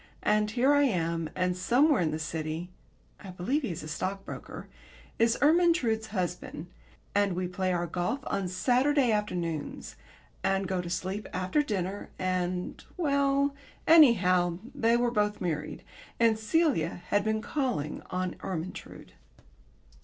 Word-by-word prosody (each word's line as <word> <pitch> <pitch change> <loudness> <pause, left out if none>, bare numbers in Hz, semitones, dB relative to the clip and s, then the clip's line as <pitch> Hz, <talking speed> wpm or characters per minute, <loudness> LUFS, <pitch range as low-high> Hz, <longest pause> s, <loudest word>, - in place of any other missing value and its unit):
and 210 0 +2
here 255 +6 +3
am 170 - +1
I, - - -7
and 180 0 +1
somewhere 250 - +3
in 165 - +1
the 155 - -2
City 160 +2 -4 0.5
(I 195 - -10
believe 185 - -1
he 255 - -3
is 165 -3 -5
a - - -7
stockbroker) 195 +5 -5 0.5
is 230 0 +3
Ermyntrude's 300 -9 +3
husband, 180 -5 -4 0.5
and 200 -2 +2
we 180 0 -1
play 185 +1 -1
our 175 -1 0
golf 180 - -2
on 195 -2 -1
Saturday 250 +8 +2
afternoons, 175 -7 -3 0.5
and 195 0 +1
go 185 -2 -1
to 175 - -7
sleep 190 +4 -3
after 185 +11 +1
dinner, 200 -7 -3
and 180 -1 -2
Well, 280 -3 +2 0.3
anyhow, 185 - +5 0.2
they 230 +1 +3
were 240 0 +1
both 210 -2 0
married, 155 -4 -3 0.4
and 225 -2 +4
Celia 220 - +1
had 205 0 +2
been 220 +1 -1
calling 245 - -2
on 185 0 -2
Ermyntrude. 185 -1 -6
195 Hz, 140 wpm, -29 LUFS, 180-245 Hz, 0.5 s, anyhow